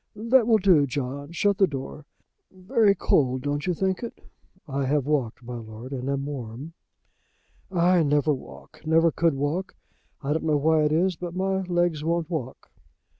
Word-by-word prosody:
That 230 +2 +3
will 225 -2 +5
do, 180 -8 +4
John, 140 +3 -4
shut 200 +3 +1
the 195 - +5
door. 140 0 -7 0.4
Very 200 +2 +2
cold, 130 -7 +1
don't 145 +2 -2
you 180 - +1
think 190 +1 -1
it." 235 - -6 0.5
"I 140 -1 -2
have 145 -1 +1
walked, 135 -5 -1
my 120 0 -6
lord, 115 +3 -9
and 130 -1 -4
am 140 0 -1
warm." 135 +2 -7 1.0
"I 180 0 +3
never 150 0 +2
walk, 130 - -11
never 165 +1 +3
could 165 -3 +1
walk. 145 +7 -2 0.5
I 140 +2 0
don't 160 - -2
know 155 -2 +2
why 155 +1 +3
it 150 - +1
is, 175 +2 +1
but 175 0 -6
my 190 +1 0
legs 175 -4 0
won't 170 +1 -1
walk." 130 -6 -5
155 Hz, 175 wpm, -25 LUFS, 140-180 Hz, 1.0 s, will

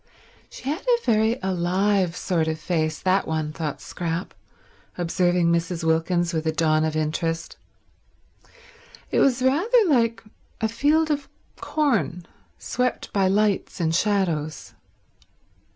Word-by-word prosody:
She 255 - -10
had 305 +7 -1
a 480 -1 +1
very 220 +1 +2
alive 185 0 +1
sort 165 -4 0
of 160 0 -1
face, 155 -1 -1
that 190 +1 +1
one, 155 -1 -2
thought 155 -3 -4
Scrap, 170 +1 -4 0.6
observing 175 0 +1
Mrs. 170 0 -1
Wilkins 170 +2 +1
with 160 0 -2
a - - +3
dawn 155 -1 +2
of 160 0 -1
interest. 165 +2 -2 1.6
It - - +2
was 255 -2 +3
rather 335 - +3
like 235 -8 +2 0.4
a 220 - +1
field 295 +8 +2
of 285 -1 -2 0.3
corn 235 - -1 0.3
swept 250 +1 -2
by 195 -2 +3
lights 205 0 +1
and 165 -2 +1
shadows. 170 -6 -1
180 Hz, 125 wpm, -24 LUFS, 165-230 Hz, 1.6 s, a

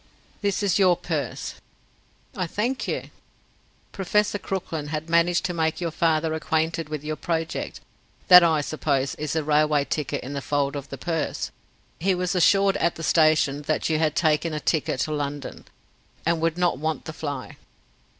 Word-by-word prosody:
"This 200 0 0
is 200 -1 +2
your 180 -3 +5
purse." 150 -7 -3 0.8
"I 180 - -2
thank 235 +9 -2
you." - - -3 0.8
"Professor 205 +2 0
Crooklyn 165 -7 -4
has 155 +1 -4
managed 170 +1 +2
to 180 - -1
make 160 -2 0
your 170 -2 -2
father 160 0 +1
acquainted 160 0 -1
with 150 -2 -4
your 155 0 -3
project. 165 0 -3 0.5
That, 180 -1 +11
I 160 -3 +3
suppose, 140 -2 -1
is 150 -1 -4
the 160 -1 0
railway 150 -1 +2
ticket 150 -1 -2
in 135 - -6
the 140 - -3
fold 140 0 0
of 140 -1 -6
the 135 - -6
purse. 165 0 -2 0.5
He 190 +3 +2
was 180 +1 -1
assured 195 +2 +4
at 170 - +1
the 165 - -7
station 155 -3 +3
that 155 - 0
you 155 -1 +1
had 155 -1 +1
taken 155 0 +1
a - - -2
ticket 150 -5 0
to 155 - -1
London, 145 -2 -4 0.6
and 165 0 +1
would 165 0 0
not 175 -6 +1
want 155 +1 -2
the 160 - -6
fly." 145 -4 -6
160 Hz, 170 wpm, -25 LUFS, 150-175 Hz, 0.8 s, That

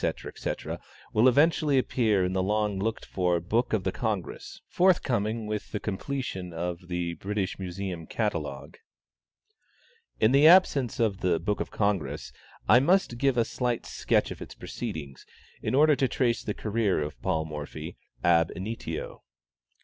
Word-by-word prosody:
etc., - - -3 0.3
will 110 +4 +5
eventually 145 +1 +4
appear 110 -7 +2
in 90 - -1
the 95 - +1
long 105 0 0
looked 110 +3 -2
for 90 -2 0
"Book 110 +9 0
of 110 -4 +1
the 95 - 0
Congress," 105 -5 -4
forthcoming 115 - +2
with 105 0 -4
the 105 - -2
completion 105 -3 -4
of 85 +1 -4
the 85 -1 -2
"British 100 +1 -3
Museum 90 -2 -5
Catalogue." 110 -2 -3 1.4
In 110 - +4
the 140 +3 +7
absence 155 - +5
of 105 -4 +1
the 85 -3 +1
"Book 105 +5 -1
of - - -3
the - - -16
Congress," 100 -6 -1 0.3
I 125 - +7
must 145 -4 +2
give 135 -2 +2
a 115 - +3
slight 125 -1 -2
sketch - - 0
of - - -8
its - - -8
proceedings, 70 -4 -6 0.4
in - - -1
order 150 +1 +6
to 135 - +2
trace 120 -2 0
the 105 - -4
career 110 -2 0
of 75 0 -7
Paul 80 -1 0
Morphy 75 +2 -7 0.3
ab 85 -1 +4
initio. 110 +5 -5
105 Hz, 155 wpm, -28 LUFS, 90-120 Hz, 1.4 s, the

